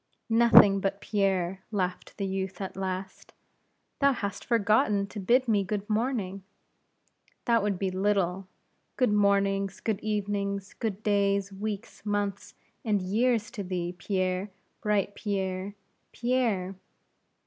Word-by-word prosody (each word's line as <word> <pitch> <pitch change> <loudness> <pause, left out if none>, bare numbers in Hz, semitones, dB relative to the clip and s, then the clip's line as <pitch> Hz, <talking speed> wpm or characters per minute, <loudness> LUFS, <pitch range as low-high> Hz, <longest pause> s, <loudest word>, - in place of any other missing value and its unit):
"Nothing 225 -4 +7
but 195 +1 -1
Pierre," 190 -3 0
laughed 185 -4 -3
the 200 - -2
youth, 190 -1 -3
at 190 -2 -5
last; 190 0 -5 0.7
"thou 280 -1 +4
hast 200 -5 -4
forgotten 210 -3 +2
to 200 +2 -8
bid 245 +7 +3
me 210 -3 +3
good 200 +1 -3
morning." 215 -4 -1 1.0
"That 235 -1 +3
would 200 -2 0
be 190 0 -1
little. 190 -1 0 0.5
Good 250 -5 +2
mornings, 200 -1 +2
good 220 -3 -1
evenings, 200 -2 -2
good 215 -2 -4
days, 200 -1 +1
weeks, 205 +1 -5
months, 205 -1 -2 0.3
and 210 -3 +1
years 220 +4 +1
to 220 -5 -5
thee, 180 -1 -3
Pierre; 185 +1 -1 0.3
bright 205 -1 +1
Pierre! 195 -1 -3 0.4
Pierre!" 230 -7 0
200 Hz, 125 wpm, -28 LUFS, 190-210 Hz, 1.0 s, Nothing